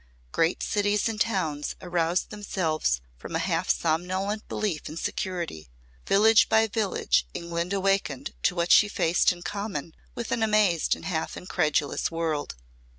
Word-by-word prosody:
Great 165 +1 +1
cities 205 +1 +1
and 220 -1 -3
towns 160 -10 -1
aroused 175 -1 0
themselves 160 - -1 0.2
from - - -7
a - - 0
half - - -1
somnolent 185 +6 0
belief 190 -8 -2
in 155 - -7
security. 170 - -4 0.4
Village 220 +3 +5
by 220 0 +5
village 205 - 0
England 170 +1 -3
awakened 195 -8 0
to - - +2
what 170 0 0
she 210 - +7
faced 170 -4 +2
in 175 -1 -8
common 200 -7 -4 0.2
with 235 -1 -5
an 230 - 0
amazed 210 -6 +3
and - - -11
half 160 -4 -2
incredulous 150 -5 0
world. 165 - -2
180 Hz, 145 wpm, -26 LUFS, 160-205 Hz, 0.4 s, she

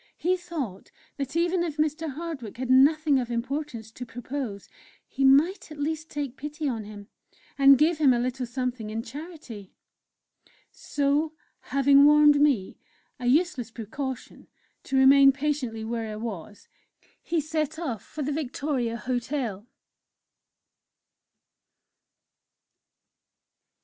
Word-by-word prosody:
He 360 +2 +1
thought 315 - -6 0.3
that 275 +1 -4
even 345 +1 +1
if 320 -3 -4
Mr. 310 +1 -1
Hardwick 290 -9 -6
had 255 0 -2
nothing 290 +2 +5
of 245 -2 -4
importance 240 -1 -4
to 245 - -8
propose, 245 -3 -6 0.4
he 270 - -3
might 300 +7 +4
at 305 - -9
least 315 +2 -3
take 285 -3 -5
pity 300 +1 -4
on 225 -5 -3
him, 205 -1 -10 0.5
and 275 -1 +7
give 310 +2 +2
him 285 -4 +5
a 245 - +3
little 250 +1 -2
something 245 -3 -3
in 225 +1 -4
charity. 260 - -10 1.0
So, 290 +2 -1 0.3
having 275 0 +4
warned 295 0 +6
me 270 -11 +1 0.4
a 245 - -3
useless 270 -4 +1
precaution 245 +4 -7 0.4
to 270 - -1
remain 275 +1 +7
patiently 270 -5 -2
where 225 -1 -3
I - - -5
was, 210 -3 -7 0.5
he 340 -1 -1
set 310 0 -2
off 270 - -4
for 300 - -6
the 285 - -2
Victoria 270 -4 -2
Hotel. 245 -4 -3
275 Hz, 125 wpm, -26 LUFS, 235-300 Hz, 1.0 s, and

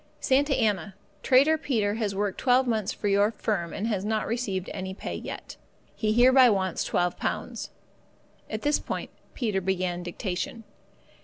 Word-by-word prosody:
"Santa 275 +1 +2
Anna 205 -5 0 0.3
"Trader 285 +5 +4
Peter 220 -9 0
has 210 -3 -2
worked 200 -1 -1
12 255 0 +4
months 220 -5 0
for 210 - -3
your 200 +1 +4
firm 205 -6 -2
and 205 - -3
has 205 -4 -1
not 215 -1 0
received 200 -5 -2
any 190 0 -5
pay - - -5
yet. - - -7 0.4
He 215 -1 0
hereby 255 +2 +6
wants 190 -4 0
£12." 175 0 -2 0.8
(At 215 0 -4
this 295 0 +2
point - - -5 0.2
Peter 210 -7 -1
began 180 -1 -1
dictation). 180 +5 -4
210 Hz, 150 wpm, -27 LUFS, 190-245 Hz, 0.8 s, hereby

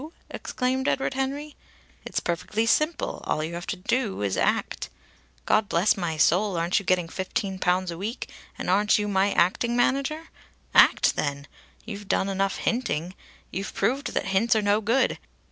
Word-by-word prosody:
exclaimed 260 +1 -2
Edward 270 - 0
Henry. 280 +3 -3 0.5
"It's - - -2
perfectly 210 +6 -1
simple. 325 - 0
All 155 - 0
you 160 +2 -4
have 175 +1 -6
to - - -2
do 200 - -1
is 100 -2 0
to - - 0
act. - - 0 0.6
God 215 -1 +2
bless 175 +5 +3
my 175 -4 -3
soul, 180 +4 +3
aren't 170 +4 +1
you 200 - -10
getting 180 -2 +2
fifteen 190 +2 -3
pounds 180 0 +1
a 170 - -7
week, 220 +6 -4 0.3
and - - -5
aren't 205 +3 +4
you 210 0 -1
my 200 0 +2
acting 235 +7 +2
manager? 275 +6 0 0.4
Act, - - +6
then! 140 -1 -2 0.4
You've 205 -2 -7
done 195 - +1
enough 195 0 0
hinting. 185 -8 -1 0.4
You've 195 +2 -5
proved 275 +4 -1
that - - 0
hints 195 +5 +2
are 215 - +2
no 205 +1 +2
good. 235 +5 +1
200 Hz, 170 wpm, -26 LUFS, 180-245 Hz, 0.6 s, Act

